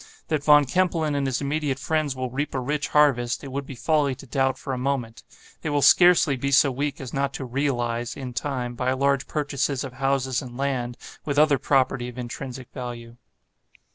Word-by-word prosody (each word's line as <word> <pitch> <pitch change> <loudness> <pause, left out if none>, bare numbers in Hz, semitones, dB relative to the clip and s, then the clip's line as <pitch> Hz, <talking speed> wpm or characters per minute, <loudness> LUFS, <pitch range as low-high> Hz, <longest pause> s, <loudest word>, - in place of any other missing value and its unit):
That 155 -3 0
Von 150 -1 +6
Kempelen 165 -1 +1
and 140 -1 0
his 130 0 -1
immediate 145 -1 -1
friends 150 -1 -1
will 130 -1 -4
reap 140 +2 -3
a - - 0
rich 145 +3 -2
harvest, 135 -5 +2
it 135 - -7
would 140 +1 -4
be 135 - -7
folly 145 0 +1
to 135 - -12
doubt 135 +1 0
for 135 - -5
a - - -2
moment. 125 -4 -2 0.4
They 155 - -3
will 145 -1 +1
scarcely 175 -5 +6
be 135 +2 -2
so 140 0 +5
weak 140 +2 -3
as 130 -3 -7
not 140 0 -1
to 135 - -5
'realize,' 120 -3 -1
in 130 -3 -6
time, 125 -1 -3
by 125 +2 0
large 140 +1 +1
purchases 140 -2 -1
of 135 -3 -7
houses 135 -1 0
and 120 -1 -9
land, 130 -3 -2 0.3
with 145 -1 -3
other 150 -2 +5
property 130 -2 +1
of 125 - -12
intrinsic 125 +1 -7
value. 120 -2 -7
135 Hz, 200 wpm, -24 LUFS, 125-145 Hz, 0.4 s, Von